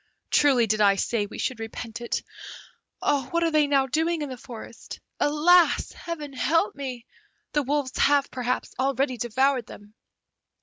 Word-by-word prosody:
Truly 265 -5 +4
did 215 0 0
I 200 -1 +5
say 205 +1 -1
we - - -10
should 255 - -2
repent 225 +1 -7
it. 235 - -2 0.8
What 290 +4 0
are 330 - +1
they 305 -1 +3
now 275 -2 +3
doing 320 +4 0
in 290 - -5
the 260 - -5
forest! 240 -2 -10 0.2
Alas! 330 +4 +4
Heaven 305 -5 -7
help 325 +9 +1
me! 255 -4 -6 0.5
the 295 - +1
wolves 280 -1 -1
have, 285 -1 +3
perhaps, 250 0 -2
already 265 -1 0
devoured 255 +2 +1
them! 205 +1 -13
265 Hz, 150 wpm, -25 LUFS, 240-295 Hz, 0.8 s, I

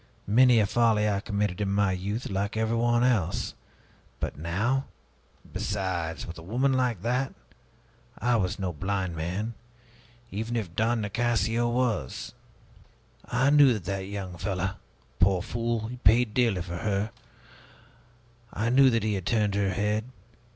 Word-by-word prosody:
Many 120 +3 +5
a 105 - +4
folly 110 -1 +3
I 100 -2 +1
committed 100 -1 -2
in 100 - 0
my 100 -1 +2
youth, 100 +6 -3
like 100 +3 -2
everyone 115 +2 +2
else. 105 -8 +1 0.7
But - - -3
now 105 - 0 0.7
Besides, 95 -5 -2
with 85 0 -8
a - - -10
woman 125 +10 +1
like 125 -7 0
that! 125 +3 0 0.8
I 120 0 +1
was 90 -4 -1
no 95 -3 -3
blind 95 +1 -2
man, 90 +8 -3 0.8
even 110 +4 -3
if 95 -7 -3
Don 115 +1 +1
Nicasio 115 +2 +1
was. 120 - -1 0.9
I 130 +3 +2
knew 145 -3 +7
that 105 -7 -5
that 95 0 -3
young 95 -4 -6
fellow 95 0 -2 0.4
poor 90 0 +3
fool, 115 0 -2
he 125 +2 -7
paid 115 0 +4
dearly 115 -8 +2
for 85 0 -5
her 100 +2 -1 1.4
I 115 +3 -1
knew 135 +1 +6
that 115 -3 +1
he 110 -1 0
had 95 -2 -3
turned 105 -3 +2
her 100 -1 +1
head. 105 +3 0
105 Hz, 145 wpm, -27 LUFS, 95-120 Hz, 1.4 s, knew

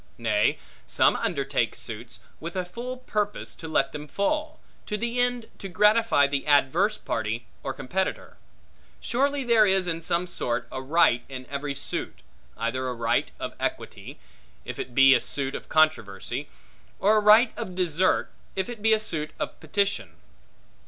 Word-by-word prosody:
Nay, 110 -3 +1 0.3
some - - +4
undertake - - -1
suits, - - -7 0.2
with 170 +3 -7
a 185 -1 -1
full 240 +8 -6
purpose 210 -5 -2
to 160 - -9
let 140 -3 +1
them 150 0 -7
fall; 300 - -1 0.3
to 210 - -2
the 235 +3 -2
end 245 -2 +1
to 195 - -6
gratify 210 -5 +4
the 140 0 -2
adverse 155 +9 +3
party, 110 +1 -3 0.2
or 135 - -3
competitor. 180 +9 -3 0.6
Surely 280 +3 0
there 230 -3 +5
is 190 -1 +3
in 165 -1 -2
some 170 +1 0
sort 120 -8 -2
a 130 - -4
right 130 -4 +3
in 130 -1 -7
every 140 0 -3
suit; 60 - -4 0.3
either 130 +3 -2
a 125 - -4
right 115 - 0
of - - -4
equity, - - -4 0.5
if - - -6
it 120 - -6
be 135 0 +8
a - - +3
suit 135 -1 -2
of - - -7
controversy; 155 -11 +1 0.5
or 210 +3 +4
a - - +3
right 215 +3 +6
of 205 -6 -6
desert, 180 0 +1 0.2
if 190 +2 -2
it 235 -3 -7
be 220 +1 +4
a 220 - +3
suit 155 -7 -2
of - - -4
petition. 200 - -1
175 Hz, 165 wpm, -26 LUFS, 135-215 Hz, 0.6 s, be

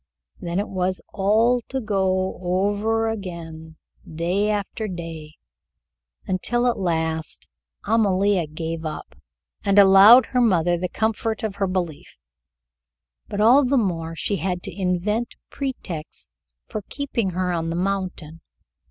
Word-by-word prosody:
Then 170 0 -4
it 205 - -1
was 185 0 -1
all 225 +5 +3
to 265 - -2
go 190 -4 0
over 205 +5 0
again, 165 -6 -6 0.4
day 180 +6 0
after 210 +1 -2
day, 165 -4 -7 0.9
until 240 +6 0
at 240 -3 +1
last 160 -3 -2 0.4
Amalia 200 -5 +2
gave 160 +1 -5
up, 155 -1 -6 0.5
and 200 0 +2
allowed 200 +5 +8
her 250 - 0
mother 175 -6 +3
the 180 +1 -3
comfort 220 +3 -1
of 205 -2 -3
her 195 -1 0
belief: 180 -5 -4 1.1
but 205 - -5
all 250 +6 +6
the 270 +2 +2
more 165 -7 -1
she 200 +4 -1
had 180 -2 -3
to - - -7
invent 200 +5 -1 0.2
pretexts 155 - -7
for 215 - -5
keeping 255 -8 -2
her 185 -1 0
on 165 -1 -2
the 165 - -2
mountain. 180 -4 -3
190 Hz, 130 wpm, -23 LUFS, 170-215 Hz, 1.1 s, allowed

